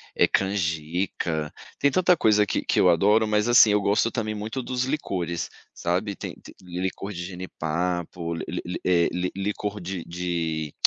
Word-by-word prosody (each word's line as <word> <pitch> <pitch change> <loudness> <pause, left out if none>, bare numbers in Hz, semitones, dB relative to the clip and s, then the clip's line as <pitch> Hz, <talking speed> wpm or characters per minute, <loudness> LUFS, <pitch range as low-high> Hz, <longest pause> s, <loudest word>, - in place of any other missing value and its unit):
Eh, - - +5
canjica. 85 -3 -1 0.3
Tem 140 - +3
tanta 180 +3 +4
coisa 105 -7 +4
que - - -1
que - - +1
eu 90 - +6
adoro, 105 +6 +4
mas 105 +2 +2
assim, 120 -3 +8
eu 105 0 +3
gosto 100 +3 +2
também 110 -3 -2
muito 110 +5 -4
dos 125 +1 -1
licores, 90 - -2 0.2
sabe. 95 +4 -1
Tem - - -6
tem - - -13
licor 95 +2 -4
de 90 -3 -5
jenipapo, 85 -1 -3
li - - -5
li 90 - -3
li 90 - -3
eh, 85 -2 +4
li 90 +1 -2
licor 105 +1 -3
de 90 -1 -4
de 85 -3 -2
95 Hz, 170 wpm, -25 LUFS, 85-105 Hz, 0.3 s, assim